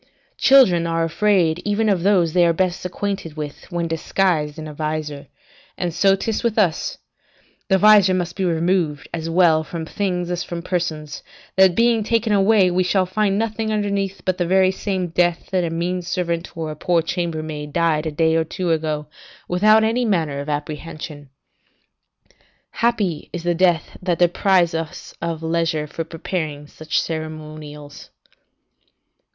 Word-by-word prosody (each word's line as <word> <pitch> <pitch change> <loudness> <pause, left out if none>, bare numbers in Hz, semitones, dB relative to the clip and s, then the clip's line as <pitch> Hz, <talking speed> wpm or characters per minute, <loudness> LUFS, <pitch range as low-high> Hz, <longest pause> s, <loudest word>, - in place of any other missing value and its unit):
Children 190 -12 +5
are 165 0 0
afraid 170 -1 +2
even 210 +2 0
of 195 -4 +2
those 180 -4 +3
they 180 - +4
are 170 - +3
best 180 +1 -1
acquainted 185 -4 -4
with, 150 +4 -7
when 170 -1 -1
disguised 165 -2 0
in 155 -1 -6
a 150 - -8
visor; 150 -1 -4 0.5
and 175 -2 -2
so 195 +3 +4
'tis 215 +3 -2
with 235 -2 -1
us; 180 -7 +1 0.7
the 190 - +4
visor 200 -2 +6
must 175 -1 -2
be 195 - -2
removed 170 -3 0
as 165 -1 -3
well 165 -2 +4
from 165 0 -6
things 180 -1 -2
as 175 -1 -2
from 170 -1 -6
persons, 160 -5 -3 0.3
that 190 -2 +5
being 230 0 +3
taken 225 0 +1
away, 195 -2 +4
we 180 +1 +1
shall 185 +1 +2
find 195 +1 0
nothing 220 0 -2
underneath 200 -3 -2
but 185 -1 0
the 175 - 0
very 190 +1 +4
same 190 -2 -3
death 175 +2 0
that 185 -2 +1
a 170 - -1
mean 175 +2 -2
servant 170 -1 -3
or 160 -1 -3
a - - -7
poor 170 +2 +1
chambermaid 155 -4 -4
died 160 -1 +1
a - - -2
day 160 +2 +2
or 165 - +2
two 170 +2 -3
ago, 155 -2 -1 0.4
without 215 +5 +4
any 230 +3 +1
manner 165 -10 0
of 140 +2 -5
apprehension. 150 0 -6 1.4
Happy 210 -9 -1
is 175 -2 -5
the 175 0 +1
death 170 -2 +1
that 180 -2 0
deprives 175 0 +3
us 165 -1 -5
of 165 -1 -3
leisure 165 -1 0
for 165 +2 -5
preparing 160 -2 -4
such 155 +2 -2
ceremonials. 155 -2 -7
175 Hz, 160 wpm, -21 LUFS, 160-190 Hz, 1.4 s, visor